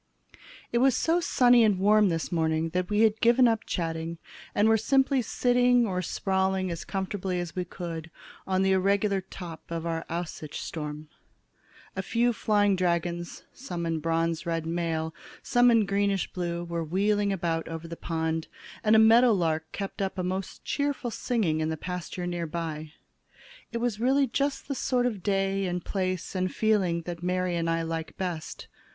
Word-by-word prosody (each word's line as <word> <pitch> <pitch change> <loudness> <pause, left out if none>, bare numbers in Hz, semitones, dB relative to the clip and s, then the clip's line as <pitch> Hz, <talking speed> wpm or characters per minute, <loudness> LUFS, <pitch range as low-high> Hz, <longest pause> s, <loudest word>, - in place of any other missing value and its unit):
It 235 - +2
was 260 -1 +4
so 330 +2 +2
sunny 245 -8 +5
and 210 -3 +3
warm 210 +1 +4
this 165 -1 -2
morning 160 -1 +1
that 180 +3 -2
we 210 +1 +2
had 220 -1 +3
given 240 +2 +5
up 225 -1 0
chatting 165 -1 -3 0.4
and 210 - +4
were 225 - +5
simply 265 +4 +2
sitting 245 0 +3
or 185 -3 -1
sprawling 190 0 0
as 165 - -5
comfortably 190 -1 -3
as 175 -3 -5
we 180 -1 -2
could 170 -2 -6 0.4
on 190 0 +2
the 190 - +3
irregular 195 +1 +2
top 175 -3 -10
of 165 0 -4
our 165 -1 -2
Aussichtsthurm. 155 -2 -5 0.9
A 190 - -1
few 235 +4 +1
flying 205 -2 +2
dragons, 175 -1 -1
some 175 -10 -5
in 165 -1 -1
bronze 165 0 0
red 165 -1 -2
mail, 165 -1 -2 0.3
some 245 0 +4
in 230 -3 +4
greenish 200 0 0
blue, 175 -1 -3
were 170 -1 -3
wheeling 200 +5 +1
about 165 -3 -1
over 165 0 -6
the 170 - -6
pond, 160 -1 -2 0.4
and 215 0 +5
a - - +7
meadow 225 +2 +6
lark 160 -4 0
kept 195 0 -5
up 195 0 -2
a 185 - -1
most 185 +1 -4
cheerful 285 -4 -1
singing 210 -11 0
in 155 0 0
the 160 - -2
pasture 180 +1 -5
nearby. 165 -3 -4 0.8
It 235 - -2
was 230 -3 -1
really 270 +4 +3
just 275 +3 -2
the 280 - -2
sort 250 -2 0
of 220 -6 -2
day 195 0 0
and 180 0 -3
place 185 -2 -2
and 185 -1 -1
feeling 190 -6 +1
that 170 0 -6
Mary 180 0 0
and 165 -1 -1
I 165 0 0
like 165 0 -4
best. 175 -4 -5
185 Hz, 170 wpm, -27 LUFS, 165-215 Hz, 0.9 s, a